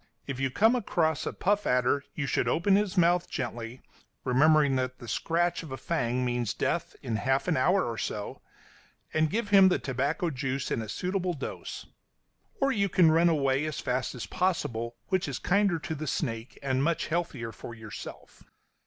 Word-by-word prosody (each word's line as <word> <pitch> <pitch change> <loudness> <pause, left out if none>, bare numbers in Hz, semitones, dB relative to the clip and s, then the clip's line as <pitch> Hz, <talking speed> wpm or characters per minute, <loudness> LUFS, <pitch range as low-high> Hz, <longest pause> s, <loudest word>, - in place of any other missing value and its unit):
If 135 -2 -5
you 135 0 +1
come 220 - +4
across 160 -9 0
a - - -1
puff 205 +2 0
adder, 125 +3 +2
you 150 - -2
should 130 - 0
open 190 +4 +3
his 200 -1 0
mouth 175 0 +3
gently, 120 -1 -5 0.4
remembering 145 +2 +4
that 130 0 -2
the 120 - -11
scratch 170 +9 0
of 160 -4 -10
a 130 - -4
fang 125 0 -1
means 120 -3 -1
death - - -1
in 115 -2 -1
half 135 +6 0
an 175 - +2
hour 180 +8 +3
or 115 -1 -4
so, 105 -1 -4 0.7
and 155 0 +2
give 210 +3 -2
him 195 -2 +7
the - - +2
tobacco 145 +6 -1
juice 135 -1 -3
in - - 0
a 110 - -7
suitable 180 - -1
dose; 140 - -6 0.7
or 275 0 +3
you 200 -5 +1
can 170 -3 +5
run 165 +2 +5
away 140 -3 +2
as 155 -1 -3
fast 125 -1 -2
as 115 -5 -5
possible, 120 - -1
which 185 -4 +1
is 135 -3 -3
kinder 195 -2 +2
to 160 - -5
the 155 0 -5
snake 115 -5 -3
and 130 -1 +1
much 165 +1 +1
healthier 155 -9 -2
for 120 - -9
yourself. 110 -2 -10
145 Hz, 185 wpm, -28 LUFS, 125-175 Hz, 0.7 s, him